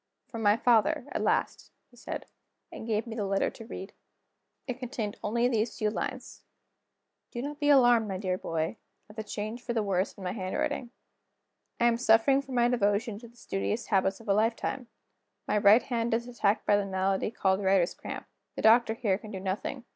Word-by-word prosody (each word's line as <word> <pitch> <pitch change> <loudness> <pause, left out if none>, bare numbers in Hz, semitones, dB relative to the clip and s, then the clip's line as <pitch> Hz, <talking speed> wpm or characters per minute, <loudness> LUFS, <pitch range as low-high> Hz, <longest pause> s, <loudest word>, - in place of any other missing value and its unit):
"From 230 -4 -7
my 205 0 +4
father, 245 +5 +3
at - - -2
last," - - 0 0.2
he - - -20
said 245 - -6 0.5
and 220 - -8
gave 220 0 0
me 230 -2 -7
the 215 - -2
letter 195 0 +1
to 225 - -11
read. 195 -2 -8 0.7
It 255 - -2
only 250 - -19
contained 235 0 -2
these 225 +1 0
few 215 -1 0
lines: - - -5 0.9
"Do 240 - -6
not 295 +1 -5
be 290 -1 +1
alarmed, 245 -5 +5
my 190 -2 -3
dear 185 -1 -1
boy, 165 +2 -3 0.3
at - - -17
the 220 - -4
change 215 +3 -5
for 240 - -3
the 225 -2 0
worse 190 -1 0
in 195 - -12
my 180 - -2
handwriting. 195 +5 -2 0.9
I 235 - +3
am 235 -1 +4
suffering 240 +3 +4
for 270 -1 -13
my 240 -1 +3
devotion 210 -2 0
to 235 - -12
the 235 +1 -21
studious 100 - -3
habits 195 -2 +1
of 225 - -15
a 200 - +3
lifetime: 230 +4 0 0.6
my 210 - +2
right 205 +4 +6
hand 235 -2 0
is 235 +1 -3
attacked 230 -4 0
by 205 - +4
the 205 - -1
malady 190 +1 0
called 190 -3 0
Writer's 190 -2 +3
Cramp. - - -7 0.3
The - - -5
doctor 225 0 +5
here 205 -4 0
can 215 - -11
do 195 -3 -6
nothing. 195 +7 -4
220 Hz, 200 wpm, -29 LUFS, 200-240 Hz, 0.9 s, right